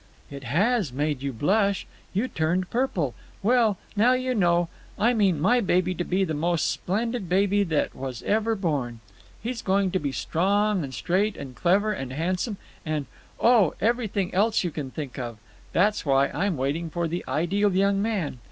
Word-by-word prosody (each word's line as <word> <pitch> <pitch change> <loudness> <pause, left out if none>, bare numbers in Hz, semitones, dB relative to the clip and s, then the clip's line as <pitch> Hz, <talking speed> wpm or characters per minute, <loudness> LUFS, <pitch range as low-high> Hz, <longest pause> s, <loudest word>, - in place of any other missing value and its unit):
"It 140 -1 -8
has 195 - +1
made 145 +1 -1
you 140 0 -2
blush! 200 - +1 0.3
You 210 +7 0
turned 175 0 -1
purple. 190 - 0 0.3
Well, 225 -2 +3 0.2
now 235 +5 +5
you 255 0 0
know. 175 -5 +2 0.3
I 235 +4 +3
mean 195 -8 +2
my 205 +10 +4
baby 185 -2 +1
to 175 - -2
be 185 +2 +1
the 160 -4 -1
most 165 +2 +1
splendid 220 0 -2
baby 200 +2 +3
that 160 -4 0
was 130 -3 -6
ever 220 +2 +1
born. 140 - -2 0.4
He's 240 +1 -3
going 195 -1 +1
to 185 - +1
be 145 -4 -2
strong 195 - +1
and 135 - -5
straight 185 - 0
and 130 -2 -8
clever 200 +7 +2
and 135 -8 -5
handsome, 185 - -1 0.3
and—oh, 160 - +1
everything 215 -4 0
else 210 +3 +2
you 175 - -2
can 145 -3 -5
think 135 -2 -6
of. 120 -3 -5 0.3
That's 210 +4 +2
why 140 -1 +3
I'm 185 0 -1
waiting 145 +6 -1
for 170 +1 -1
the 175 +2 -3
ideal 195 +6 +1
young 195 +1 +3
man. 200 - -2
185 Hz, 170 wpm, -25 LUFS, 150-210 Hz, 0.4 s, now